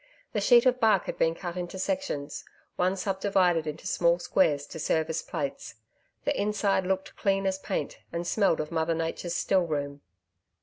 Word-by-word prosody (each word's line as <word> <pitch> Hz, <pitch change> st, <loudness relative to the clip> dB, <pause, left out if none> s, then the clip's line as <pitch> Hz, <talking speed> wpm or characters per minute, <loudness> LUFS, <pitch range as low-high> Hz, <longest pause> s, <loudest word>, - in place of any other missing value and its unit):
The 210 Hz, -, 0 dB
sheet 240 Hz, +4 st, +6 dB
of 255 Hz, 0 st, +3 dB
bark 220 Hz, -5 st, +4 dB
had -, -, -4 dB
been 165 Hz, 0 st, +2 dB
cut 175 Hz, -1 st, -6 dB
into 180 Hz, +1 st, -5 dB
sections 185 Hz, -, -3 dB, 0.3 s
one 185 Hz, +2 st, +1 dB
sub 190 Hz, 0 st, -2 dB
divided 180 Hz, -5 st, +2 dB
into 150 Hz, +1 st, -6 dB
small 170 Hz, 0 st, +3 dB
squares 155 Hz, -5 st, +1 dB
to 160 Hz, -, -9 dB
serve 160 Hz, +1 st, 0 dB
as 160 Hz, -, -2 dB
plates. 140 Hz, -8 st, -5 dB, 0.5 s
The -, -, +1 dB
inside 200 Hz, -2 st, +1 dB
looked 190 Hz, 0 st, -2 dB
clean 195 Hz, -1 st, +1 dB
as 190 Hz, 0 st, 0 dB
paint, -, -, -3 dB
and 170 Hz, +1 st, -3 dB
smelled 195 Hz, -3 st, +2 dB
of 150 Hz, +1 st, -3 dB
Mother 165 Hz, 0 st, 0 dB
Nature's 165 Hz, +1 st, -3 dB
still 185 Hz, -2 st, +2 dB
room. 145 Hz, -2 st, -3 dB
175 Hz, 180 wpm, -28 LUFS, 160-195 Hz, 0.5 s, sheet